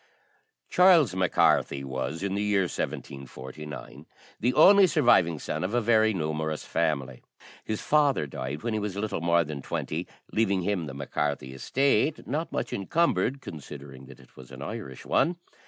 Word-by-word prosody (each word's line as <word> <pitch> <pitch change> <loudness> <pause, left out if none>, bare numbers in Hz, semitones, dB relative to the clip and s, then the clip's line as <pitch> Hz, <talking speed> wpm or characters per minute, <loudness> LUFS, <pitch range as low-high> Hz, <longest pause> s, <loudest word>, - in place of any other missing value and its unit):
Charles 170 - +5
Mac 95 -1 0
Carthy 70 0 +3
was, 65 +5 -4
in 100 -1 -1
the 100 - -1
year 105 -1 +2
1749, 70 -2 -7 0.3
the 120 - +2
only 195 +4 +7
surviving 105 - +3
son 75 - -4
of 100 +6 -2
a - - +4
very 110 -1 +3
numerous 80 -4 -2
family. 70 -6 -1 0.4
His 110 - -3
father 145 - +3
died 70 +3 -6
when 115 -1 -1
he 110 - 0
was 105 -2 -4
little 105 -5 -2
more 85 0 +3
than 75 -2 -6
twenty, - - -4 0.2
leaving 100 -4 +1
him 90 -5 -1
the 70 - -7
Mac 70 0 -7
Carthy 70 -3 -2
estate, 135 - +1
not 155 +5 -3
much - - -3
encumbered, 135 - 0
considering 70 - -10
that - - -14
it - - -20
was 65 -1 -13
an 65 +1 -9
Irish 95 - -7
one. 175 - +2
90 Hz, 165 wpm, -27 LUFS, 70-115 Hz, 0.4 s, only